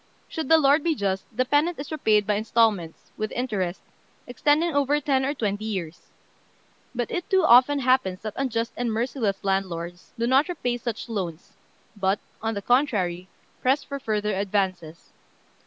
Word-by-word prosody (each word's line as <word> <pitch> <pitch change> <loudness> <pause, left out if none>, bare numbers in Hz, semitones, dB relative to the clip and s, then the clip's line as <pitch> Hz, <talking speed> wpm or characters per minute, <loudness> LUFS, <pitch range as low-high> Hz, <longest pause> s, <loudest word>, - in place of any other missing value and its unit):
Should 320 -4 -5
the 325 - +7
lord 290 0 +4
be 330 -2 +1
just, 195 -4 -1
the 250 +3 0
peasant 300 +6 +2
is 280 +2 -7
repaid 215 -9 +2
by 210 - +1
instalments, 215 -5 0
with 215 0 -3
interest, 200 -8 -2 0.4
extending 300 +6 +1
over 285 +1 +2
ten 270 -2 +1
or 280 +3 -1
twenty 210 -3 -2
years. 180 -6 -5 0.9
But 240 -1 -2
it 355 - -3
too 380 -2 +3
often 260 +1 +6
happens 255 -8 +1
that 215 -1 -5
unjust 230 -4 -2
and 240 -1 -1
merciless 225 -3 -1
lords 180 -3 -3
do 230 - 0
not 265 +7 +3
repay 245 -8 -2
such 235 -1 -5
loans, 185 -7 -5 0.4
but, 195 0 +1 0.2
on 225 0 -2
the 200 - -4
contrary, 195 -9 +1 0.3
press 265 +3 +2
for 280 0 -6
further 210 -3 -1
advances. 190 -4 -2
230 Hz, 160 wpm, -25 LUFS, 195-275 Hz, 0.9 s, the